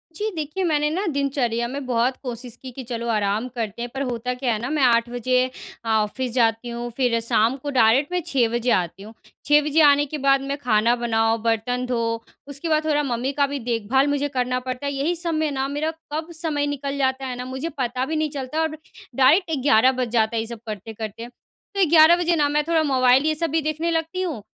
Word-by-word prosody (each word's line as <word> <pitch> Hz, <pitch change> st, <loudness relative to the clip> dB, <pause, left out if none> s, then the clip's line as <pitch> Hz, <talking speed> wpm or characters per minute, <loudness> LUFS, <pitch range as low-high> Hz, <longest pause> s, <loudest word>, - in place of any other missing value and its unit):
जी, 430 Hz, +4 st, -2 dB
देखिए 310 Hz, +4 st, -3 dB
मैंने 300 Hz, -3 st, +1 dB
ना 370 Hz, +6 st, -2 dB
दिनचर्या 270 Hz, -6 st, -1 dB
में 275 Hz, +2 st, -5 dB
बहुत 250 Hz, +1 st, +1 dB
कोशिश 245 Hz, -1 st, -6 dB
की 260 Hz, -, -8 dB
कि 260 Hz, +2 st, -8 dB
चलो 235 Hz, -1 st, -5 dB
आराम 210 Hz, +2 st, 0 dB
करते 230 Hz, -1 st, -4 dB
हैं 240 Hz, -, -4 dB
पर 270 Hz, -, -4 dB
होता 245 Hz, +1 st, -3 dB
क्या 250 Hz, -2 st, -1 dB
है 215 Hz, -, -2 dB
ना 245 Hz, -, -3 dB
मैं 300 Hz, -2 st, +1 dB
8 235 Hz, -1 st, +3 dB
बजे 250 Hz, +1 st, +1 dB, 0.4 s
ऑफ़िस 220 Hz, +3 st, 0 dB
जाती 230 Hz, -1 st, +1 dB
हूँ 235 Hz, 0 st, -5 dB
फिर 245 Hz, -3 st, +2 dB
शाम 225 Hz, +2 st, +2 dB
को 285 Hz, +2 st, -6 dB
डायरेक्ट 250 Hz, +7 st, +4 dB
मैं 360 Hz, 0 st, 0 dB
6 260 Hz, -8 st, +2 dB
बजे 240 Hz, +1 st, +1 dB
आती 180 Hz, +2 st, -1 dB
हूँ। 220 Hz, -, -11 dB, 0.3 s
6 295 Hz, 0 st, +5 dB
बजे 300 Hz, +2 st, +2 dB
आने 290 Hz, -1 st, +5 dB
के 300 Hz, +2 st, -5 dB
बाद 275 Hz, -1 st, +3 dB
मैं 275 Hz, +1 st, -3 dB
खाना 235 Hz, -3 st, +2 dB
बनाओ, 225 Hz, -1 st, +1 dB
बर्तन 230 Hz, +3 st, -1 dB
धो, 230 Hz, -2 st, -2 dB, 0.2 s
उसके 285 Hz, +4 st, -5 dB
बाद 310 Hz, 0 st, +2 dB
थोड़ा 295 Hz, -1 st, +1 dB
मम्मी 255 Hz, 0 st, -1 dB
का 285 Hz, 0 st, +2 dB
भी 280 Hz, 0 st, -4 dB
देखभाल 240 Hz, +3 st, +1 dB
मुझे 285 Hz, 0 st, 0 dB
करना 250 Hz, 0 st, 0 dB
पड़ता 255 Hz, +2 st, -5 dB
है 280 Hz, -, -1 dB
यही 295 Hz, +6 st, 0 dB
सब 335 Hz, -1 st, -2 dB
में 310 Hz, -1 st, 0 dB
ना 270 Hz, -1 st, -1 dB
मेरा 295 Hz, +3 st, -2 dB, 0.2 s
कब 320 Hz, +2 st, -4 dB
समय 295 Hz, -3 st, -1 dB
निकल 280 Hz, -1 st, -3 dB
जाता 265 Hz, -1 st, 0 dB
है 255 Hz, -1 st, -4 dB
ना 250 Hz, 0 st, -6 dB
मुझे 265 Hz, +5 st, -4 dB
पता 255 Hz, 0 st, -1 dB
भी 315 Hz, -, -3 dB
नहीं 310 Hz, 0 st, 0 dB
चलता 285 Hz, +2 st, -3 dB
और 315 Hz, -1 st, -2 dB, 0.4 s
डायरेक्ट 320 Hz, +7 st, +4 dB
11 255 Hz, -2 st, +5 dB
बज 245 Hz, -, -1 dB
जाता 225 Hz, -1 st, +1 dB
है 225 Hz, -, +1 dB
ये 225 Hz, -, -6 dB
सब 235 Hz, -1 st, -7 dB
करते-करते। 220 Hz, +2 st, -6 dB, 0.5 s
तो 395 Hz, -2 st, +4 dB
11 320 Hz, +1 st, +7 dB
बजे 350 Hz, -1 st, +1 dB
ना 295 Hz, -3 st, +2 dB
मैं 300 Hz, +1 st, +1 dB
थोड़ा 330 Hz, -1 st, +3 dB
मोबाइल 260 Hz, -1 st, +4 dB
ये 310 Hz, 0 st, +2 dB
सब 330 Hz, +2 st, -1 dB
भी 320 Hz, +1 st, +1 dB
देखने 310 Hz, +3 st, -1 dB
लगती 330 Hz, +3 st, -2 dB
हूँ, 320 Hz, -, -3 dB
260 Hz, 225 wpm, -23 LUFS, 235-295 Hz, 0.5 s, 11